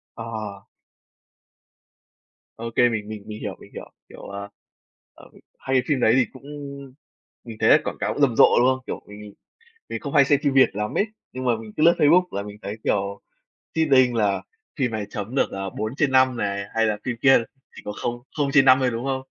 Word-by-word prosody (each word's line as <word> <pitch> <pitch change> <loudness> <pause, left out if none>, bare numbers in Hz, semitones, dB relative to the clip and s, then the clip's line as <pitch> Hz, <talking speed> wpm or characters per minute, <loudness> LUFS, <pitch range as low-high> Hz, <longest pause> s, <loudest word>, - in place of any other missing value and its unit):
Ờ. 110 -3 -7 1.9
Ô 115 +1 -5
kê, 120 0 +5
mình 110 -3 -3
mình 105 -2 -7
mình 105 0 -8
hiểu, - - -4
mình - - -16
hiểu, - - -9 0.2
kiểu, - - -12
ờ, 100 0 -7 0.6
ờ, - - -16 0.3
hai 135 - -2
cái 130 - +3
phim 145 -3 +1
đấy 110 -2 +4
thì 130 - +4
cũng 130 - -14 1.0
mình 115 -3 -9
thấy - - +3
là - - +7
quảng - - -4
cáo - - -2
rầm 135 -5 +3
rộ, - - +8
đúng 125 - +4
không? 130 0 0
Kiểu, - - -5
mình 105 0 -11
mình 105 -1 -11 0.6
mình - - -5
không 140 - -6
hay 140 - +6
xem 140 +1 +2
phim 140 -3 +1
Việt 135 -1 +6
lắm 105 0 -3
ấy, 205 - +2 0.3
nhưng 130 0 -6
mà 120 -2 +2
mình 110 -1 -11
cứ 155 - -1
lướt 170 +2 +6
Facebook 170 +5 +5
là 100 - -3
mình 105 0 -9
thấy 100 +2 -5
kiểu 100 0 -1 0.5
seeding 135 -6 +4
là 105 -4 +1 0.4
phim 130 -3 +1
này 110 -2 -4
chấm 105 +4 -6
được, 135 - +1
ờ, 95 0 -5
4/5 130 +3 +1
này, 100 -3 -2
hay 115 0 +2
là 105 -1 -1
phim 120 -2 -3
kia 135 -3 +6 0.3
chỉ - - -10
có 105 - -4
không 120 0 -3 0.2
không 145 -2 0
trên 135 -2 +6
5 130 -1 +7
thôi, 130 -1 +2
đúng 115 +1 -4
không? 135 -1 -2
120 Hz, 220 wpm, -23 LUFS, 105-135 Hz, 1.9 s, rộ